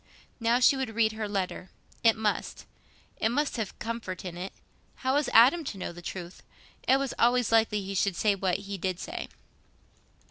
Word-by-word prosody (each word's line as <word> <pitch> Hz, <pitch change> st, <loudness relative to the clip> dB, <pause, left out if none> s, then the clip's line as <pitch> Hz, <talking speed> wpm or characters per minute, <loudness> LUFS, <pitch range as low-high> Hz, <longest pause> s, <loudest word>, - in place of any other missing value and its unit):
Now 230 Hz, +1 st, +3 dB
she 255 Hz, +2 st, +6 dB
would 260 Hz, -5 st, -3 dB
read 225 Hz, -1 st, +3 dB
her 220 Hz, -1 st, -4 dB
letter. 190 Hz, -2 st, -3 dB, 0.3 s
It 225 Hz, -1 st, +6 dB
must—it 220 Hz, 0 st, -4 dB
must 285 Hz, +2 st, 0 dB
have 220 Hz, -4 st, -4 dB
comfort 225 Hz, -5 st, -5 dB
in 175 Hz, -2 st, -5 dB
it. 180 Hz, +2 st, -5 dB, 0.4 s
How 260 Hz, 0 st, -1 dB
was 290 Hz, 0 st, +1 dB
Adam 260 Hz, +9 st, +6 dB
to 205 Hz, -, -5 dB
know 185 Hz, -, -4 dB
the 175 Hz, 0 st, -11 dB
truth? 175 Hz, 0 st, -7 dB, 0.5 s
It 265 Hz, -, +6 dB
was 275 Hz, -1 st, -2 dB
always 245 Hz, -1 st, +3 dB
likely 220 Hz, -2 st, +3 dB
he 195 Hz, +1 st, -5 dB
should 195 Hz, -1 st, +1 dB
say 210 Hz, +3 st, +2 dB
what 190 Hz, -2 st, 0 dB
he 200 Hz, -1 st, -5 dB
did 185 Hz, 0 st, -2 dB
say. -, -, -5 dB
220 Hz, 180 wpm, -28 LUFS, 190-240 Hz, 0.5 s, she